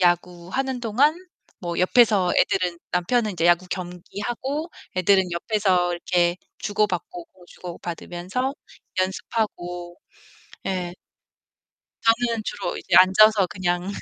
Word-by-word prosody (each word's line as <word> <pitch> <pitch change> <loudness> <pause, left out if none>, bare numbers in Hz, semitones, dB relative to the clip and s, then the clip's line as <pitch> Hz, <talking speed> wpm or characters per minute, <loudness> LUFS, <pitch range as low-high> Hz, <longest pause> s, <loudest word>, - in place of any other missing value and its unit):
야구하는 180 +9 0
동안 255 +7 +3 0.5
뭐 175 -1 -3
옆에서 200 -1 +4
애들은 180 -3 +1
남편은 215 +5 +1
이제 170 -2 -2
야구 175 +1 +4
경기하고 230 - -4 0.3
애들은 185 0 +3
옆에서 180 -1 +1
이렇게 175 0 +1 0.2
주고받고 210 - -2
공 180 - -21
주고받으면서 180 - -5 0.4
연습하고. 180 -3 -3 0.7
예. 180 -2 -2 1.1
저는 230 0 +2
주로 205 - -4
이제 - - 0
앉아서 195 +1 +6
그냥 180 +1 -2
185 Hz, 255 characters per minute, -24 LUFS, 175-220 Hz, 1.1 s, 앉아서